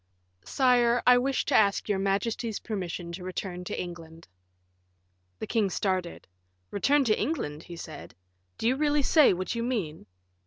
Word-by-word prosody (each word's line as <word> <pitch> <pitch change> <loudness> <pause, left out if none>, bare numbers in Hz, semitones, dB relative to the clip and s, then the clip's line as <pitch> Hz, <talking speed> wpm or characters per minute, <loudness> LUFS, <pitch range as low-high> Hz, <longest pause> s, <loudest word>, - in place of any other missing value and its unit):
"Sire, 245 -2 +3
I 250 0 +7
wish 270 +1 0
to - - 0
ask 200 -2 +3
your 205 -2 0
majesty's 205 +3 -1
permission 180 -5 -5
to 180 +2 -7
return 180 0 -5
to - - -4
England." 165 -2 -8 1.1
The - - -5
king 215 -4 +1
started. 185 -2 -2 0.4
"Return 275 +8 +2
to 220 -4 +1
England," 210 - -2
he 170 - -10
said; 155 - -9 0.4
"do 225 - -1
you 255 - +3
really 295 0 +1
say 305 +1 +5
what 185 -1 -2
you 235 - -2
mean?" 210 -11 -3
200 Hz, 155 wpm, -28 LUFS, 175-245 Hz, 1.1 s, I